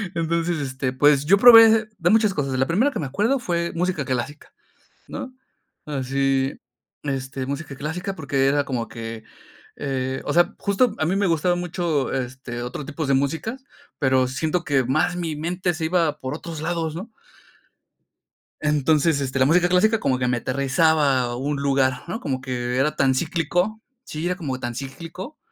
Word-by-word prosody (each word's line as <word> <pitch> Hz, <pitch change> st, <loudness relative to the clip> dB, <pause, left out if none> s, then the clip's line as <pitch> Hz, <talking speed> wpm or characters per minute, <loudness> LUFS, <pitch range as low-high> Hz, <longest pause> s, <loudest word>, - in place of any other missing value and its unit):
Entonces, 170 Hz, 0 st, 0 dB
este, 130 Hz, -2 st, -3 dB
pues 145 Hz, +1 st, +4 dB
yo 200 Hz, +5 st, +5 dB
probé 225 Hz, 0 st, +10 dB
hacer 220 Hz, -1 st, +3 dB
de 175 Hz, +1 st, +2 dB
muchas 215 Hz, -2 st, +4 dB
cosas. 135 Hz, -4 st, -2 dB
La 130 Hz, -, +2 dB
primera 215 Hz, -, +2 dB
que 230 Hz, -, -5 dB
me 150 Hz, -, -2 dB
acuerdo 210 Hz, -, +1 dB
fue 170 Hz, -7 st, -2 dB
música 175 Hz, -5 st, -1 dB
clásica, 130 Hz, +4 st, -4 dB, 0.6 s
¿no?, 255 Hz, 0 st, -7 dB, 0.5 s
así, 135 Hz, -1 st, -1 dB, 0.4 s
este, 135 Hz, -1 st, -3 dB
música 140 Hz, 0 st, -5 dB
clásica, 180 Hz, +7 st, -4 dB
porque 140 Hz, -3 st, 0 dB
era 145 Hz, 0 st, +2 dB
como 125 Hz, -4 st, -3 dB
que, 115 Hz, -1 st, -7 dB, 0.5 s
eh, 130 Hz, -1 st, -3 dB
o -, -, -1 dB
sea, 175 Hz, 0 st, +3 dB
justo 210 Hz, +4 st, +1 dB
a 155 Hz, -, +1 dB
mí 185 Hz, -, +1 dB
me 200 Hz, 0 st, +2 dB
gustaba 175 Hz, +1 st, +1 dB
mucho, 170 Hz, -5 st, -1 dB
este, 130 Hz, -2 st, -4 dB
otro 125 Hz, +4 st, -5 dB
tipos 155 Hz, 0 st, -4 dB
de -, -, +3 dB
música, 160 Hz, -, -1 dB, 0.4 s
pero 130 Hz, -2 st, +3 dB
siento 160 Hz, +7 st, -1 dB
que 135 Hz, -3 st, +2 dB
más 155 Hz, +8 st, +1 dB
mi 165 Hz, -4 st, -3 dB
mente 175 Hz, +3 st, -2 dB
se 160 Hz, 0 st, -4 dB
iba 160 Hz, -3 st, +1 dB
por 130 Hz, +2 st, -4 dB
otros 160 Hz, -1 st, -7 dB
lados, 165 Hz, -2 st, -2 dB
¿no? 210 Hz, +6 st, -7 dB, 1.5 s
Entonces, 150 Hz, +1 st, +2 dB
este, 135 Hz, -1 st, -2 dB
la 130 Hz, -, +5 dB
música 175 Hz, +4 st, +4 dB
clásica 215 Hz, +5 st, +3 dB
como 130 Hz, -2 st, +1 dB
que 125 Hz, -1 st, -1 dB
me 125 Hz, -1 st, +1 dB
aterrizaba 140 Hz, +2 st, +2 dB
a 120 Hz, 0 st, -2 dB
un 140 Hz, +3 st, -2 dB
lugar, 135 Hz, -2 st, +1 dB
¿no?, 200 Hz, +6 st, -4 dB
como 135 Hz, -, -3 dB
que 125 Hz, -1 st, -3 dB
era 145 Hz, +3 st, +1 dB
tan 135 Hz, -1 st, +3 dB
cíclico, 180 Hz, +9 st, -1 dB, 0.2 s
sí, 155 Hz, +2 st, -5 dB
era 180 Hz, +1 st, 0 dB
como 135 Hz, -8 st, -4 dB
tan 120 Hz, -1 st, -4 dB
cíclico, 165 Hz, -, -8 dB
150 Hz, 175 wpm, -23 LUFS, 135-175 Hz, 1.5 s, probé